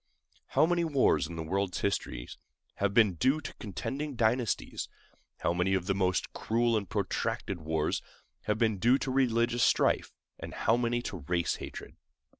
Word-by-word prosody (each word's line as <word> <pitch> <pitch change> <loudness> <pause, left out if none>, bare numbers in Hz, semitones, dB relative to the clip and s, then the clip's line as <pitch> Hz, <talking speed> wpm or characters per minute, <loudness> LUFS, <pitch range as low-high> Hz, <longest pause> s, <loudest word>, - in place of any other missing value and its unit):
How - - +4
many 175 0 +1
wars 145 -5 +3
in 85 - -8
the 80 - -4
world's 95 +3 -1
history 100 -11 -2 0.5
have 100 -1 +1
been 105 -2 +5
due 130 - +2
to - - -7
contending 135 - -4
dynasties; 115 0 0 0.5
how - - +1
many 90 +2 +1
of 90 -2 -1
the 95 - +1
most 95 -1 0
cruel 115 +1 +1
and 100 -4 -2
protracted 95 -3 -2
wars 80 +1 0 0.4
have 105 0 +1
been 110 -3 +1
due 120 +6 +5
to 135 - -3
religious 120 -2 +2
strife; - - +3 0.4
how 115 - +2
many 120 0 0
to 95 - -4
race 85 +2 -1
hatred! - - -8
110 Hz, 160 wpm, -30 LUFS, 95-120 Hz, 0.5 s, been